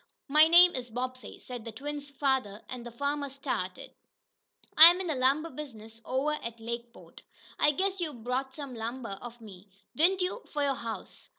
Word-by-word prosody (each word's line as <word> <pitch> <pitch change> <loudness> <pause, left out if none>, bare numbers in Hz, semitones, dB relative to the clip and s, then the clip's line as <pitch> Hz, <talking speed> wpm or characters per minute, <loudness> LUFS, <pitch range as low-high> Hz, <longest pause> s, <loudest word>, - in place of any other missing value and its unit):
"My 305 +2 +6
name 350 +2 +7
is 250 -1 -5
Bobbsey," 255 +2 -6
said 245 -3 -8
the 230 - -7
twins' 285 +4 -6
lather, 260 -7 0
and 250 -2 -6
the 240 - -7
farmer 285 +3 -2
started. 255 -9 -5 0.8
"I'm 340 +3 +10
in 380 - -3
the 325 - -1
lumber 275 +5 +1
business 225 -6 -9
over 265 +4 0
at 235 0 -6
Lakeport. 235 +1 -8 0.4
I - - +5
guess 380 +6 -1
you 325 -3 -1
bought 255 +2 -4
some 280 -3 -7
lumber 230 -2 -5
of 240 0 -9
me, 200 -3 -13 0.3
didn't 370 +5 +3
you, 365 +7 -2
for 295 -1 -1
your 280 -1 +2
house." 230 -3 -7
260 Hz, 175 wpm, -29 LUFS, 235-295 Hz, 0.8 s, I'm